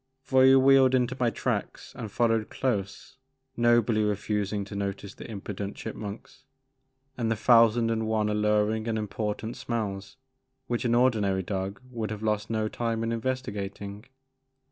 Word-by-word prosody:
Voyou 130 0 +6
wheeled 135 -1 +6
into 125 0 +1
my 120 -2 +3
tracks - - -3
and 110 -4 -6
followed 115 -1 +1
close, 105 0 -3 0.4
nobly 120 -2 +3
refusing 105 0 -1
to 100 - -9
notice 100 0 -4
the - - -10
impudent 100 -1 -5
chip - - -6
munks 105 +5 -8 0.8
and 115 -2 0
the 115 - +1
thousand 115 0 +4
and 110 -1 -1
one 110 -1 +1
alluring 105 +1 +1
and 110 -1 0
important 110 +1 -3
smells 100 -2 -4 0.5
which 120 -1 -2
an 120 -1 +2
ordinary 105 -7 +2
dog 95 +1 -3
would 115 -3 -3
have 110 0 -6
lost 105 0 -1
no 110 -1 0
time 115 0 -2
in 115 - -1
investigating. 105 -4 -4
110 Hz, 145 wpm, -27 LUFS, 105-120 Hz, 0.8 s, Voyou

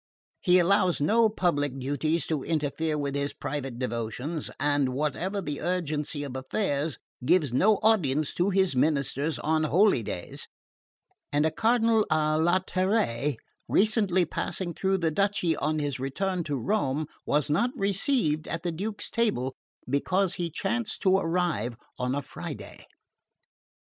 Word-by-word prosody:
He 180 0 +4
allows 185 0 +3
no 220 +9 +4
public 145 -9 0
duties 145 +5 0
to 150 -4 -2
interfere 155 0 -1
with 140 -1 -2
his 140 0 -1
private 135 -4 -4
devotions, 125 +5 -3
and 145 -2 +1
whatever 170 +8 -1
the 145 -4 -4
urgency 155 -4 -2
of 135 -3 -6
affairs, 145 +1 -1 0.3
gives 155 -2 +3
no 210 +11 +4
audience 155 -10 +3
to 180 +3 +1
his 190 -5 +2
ministers 140 +2 +1
on 155 0 +1
holydays; 150 - +1 0.8
and 145 +1 +2
a 160 - +2
Cardinal 225 +3 +3
a 155 0 +2
latere 180 - +1 0.3
recently 200 -4 +3
passing 175 +2 -3
through 190 +3 +1
the 165 -3 0
duchy 195 -2 +1
on 155 +2 -1
his 145 -3 -2
return 180 +7 -2
to 145 - -2
Rome 145 - 0 0.2
was 150 0 +2
not 235 +12 +2
received 195 - 0
at 165 - -4
the 175 - -1
Duke's 205 +6 -3
table 200 - 0 0.3
because 180 +8 +1
he 175 -1 -2
chanced 215 +7 -2
to 190 -2 +5
arrive 165 - -1 0.2
on 125 +1 0
a 145 - -2
Friday. - - -8
160 Hz, 140 wpm, -27 LUFS, 145-190 Hz, 0.8 s, to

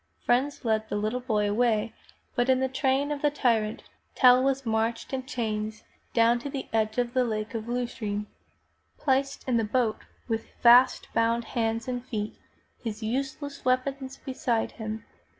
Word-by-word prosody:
Friends 265 +3 +1
led 220 -1 +1
the - - -2
little 215 +4 -1
boy 215 -5 0
away, 220 +1 +1 0.4
but 245 0 +1
in 260 0 +4
the 265 - +1
train 270 +2 +1
of 290 -1 -3
the 295 - +4
tyrant. 230 -7 0 0.3
Tell 250 -1 +7
was 270 0 0
marched 225 +2 -1
in 260 -1 -3
chains 215 -5 -3 0.3
down 235 +1 +4
to 280 - -5
the 275 -1 -5
edge 220 0 +1
of 245 -1 0
the 255 - +3
Lake 215 -2 -3
of 225 0 -4
Lucerne. 235 -4 -2 0.7
Placed 270 0 0
in 245 -2 +2
the 225 - +2
boat 220 0 +1 0.3
with 225 -1 -2
fast 245 +2 +6
bound 230 +1 +2
hands 225 -1 -1
and 245 -1 -3
feet, 215 -5 -4 0.5
his 220 -1 -4
useless 275 +4 -3
weapons 265 +1 0
beside 245 -3 -1
him. 220 -1 -6
240 Hz, 165 wpm, -27 LUFS, 220-260 Hz, 0.7 s, Tell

